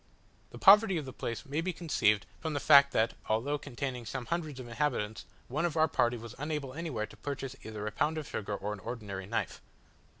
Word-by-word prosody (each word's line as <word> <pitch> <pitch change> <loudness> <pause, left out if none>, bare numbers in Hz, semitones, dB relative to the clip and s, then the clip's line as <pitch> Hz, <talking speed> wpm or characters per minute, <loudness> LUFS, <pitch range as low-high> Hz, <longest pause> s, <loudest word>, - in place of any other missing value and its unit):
The - - -10
poverty 200 -1 +7
of 150 - -3
the 130 - -7
place 115 +4 -4
may 145 +3 -1
be 185 +2 -1
conceived 105 - +2
from 160 -1 -3
the 145 - 0
fact, 140 -1 +7
that 110 -1 +2 0.2
although 130 +7 +1
containing 125 -3 -5
some 130 -2 -4
hundreds 155 -4 -3
of 125 - -7
inhabitants, 115 -4 -2 0.2
one 150 +6 -1
of 170 -2 0
our 160 0 +5
party 120 -4 +1
was 115 -1 -9
unable 150 -3 -3
anywhere 145 -9 -3
to 105 - -15
purchase 135 +2 -5
either 110 -1 -6
a 105 - -2
pound 155 +8 0
of 155 - -4
sugar 105 -1 -3
or 105 +1 -3
an 105 - -8
ordinary 100 -3 -6
knife. 115 +2 -2
135 Hz, 210 wpm, -31 LUFS, 110-155 Hz, 0.2 s, poverty